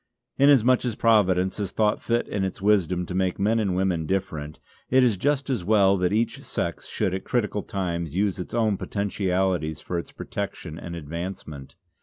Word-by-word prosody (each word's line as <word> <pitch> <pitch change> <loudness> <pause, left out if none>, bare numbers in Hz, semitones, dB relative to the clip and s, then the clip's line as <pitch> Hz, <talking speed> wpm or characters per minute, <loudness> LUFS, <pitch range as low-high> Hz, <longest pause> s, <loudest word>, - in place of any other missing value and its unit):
Inasmuch 130 -3 +5
as 120 -3 -2
Providence 95 -5 +3
has 100 -3 -3
thought 105 -1 +1
fit 120 0 0
in 100 -2 -2
its 95 - -3
wisdom 95 -3 +2
to 90 - -6
make 95 -1 0
men 110 +3 +2
and 100 -4 0
women 90 -4 0
different, 80 -6 -3 0.3
it 130 0 +5
is 120 -4 +3
just 140 +6 0
as 125 -9 -1
well 100 0 +4
that 90 0 +1
each 115 +3 0
sex - - -4
should 95 - -1
at 95 - -3
critical 105 -4 -1
times 85 -6 -3
use 100 0 0
its 90 - -5
own 110 -4 +2
potentialities 95 -6 -1
for 85 - -3
its - - -8
protection 80 +1 -6
and 85 0 -7
advancement. 80 -3 -7
95 Hz, 180 wpm, -25 LUFS, 90-110 Hz, 0.3 s, Inasmuch